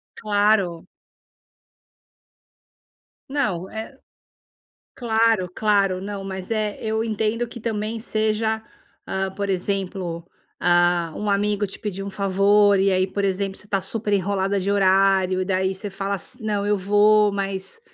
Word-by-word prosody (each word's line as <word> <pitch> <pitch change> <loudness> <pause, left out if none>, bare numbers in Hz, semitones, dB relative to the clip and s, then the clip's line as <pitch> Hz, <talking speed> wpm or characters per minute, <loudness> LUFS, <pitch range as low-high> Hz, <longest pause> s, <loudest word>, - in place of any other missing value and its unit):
Claro. 205 -5 +1 2.4
Não, 210 -11 -1
é 220 +5 -7 1.0
claro, 225 -5 +2
claro, 200 -3 +2
não, 200 0 -5
mas, 190 +1 -6
eh, 215 -2 -1
eu 220 0 -1
entendo 220 +1 -1
que 235 - -10
também 220 0 -3
seja, 220 0 0 0.4
ah, 190 0 -2
por 200 +1 -4
exemplo, 185 -3 -2 0.3
ah, 175 -1 +2
um 210 - -2
amigo 205 +1 +1
te 195 - -9
pediu 195 -2 -4
um - - -4
favor 200 +1 +3
e 195 +1 +3
aí 185 0 +2
por 200 +1 -2
exemplo 195 0 -1
você 210 - -11
tá 195 -2 0
super 205 +2 -2
enrolada 195 0 0
de 195 +2 -1
horário 190 -1 +3
e - - -1
daí 190 0 0
você 205 +2 -5
fala 195 +1 -3
assi 235 +6 -7
não 210 -2 -1
eu 205 0 +2
vou, 205 +2 +4
mas, 195 - -4
200 Hz, 140 wpm, -23 LUFS, 190-215 Hz, 2.4 s, vou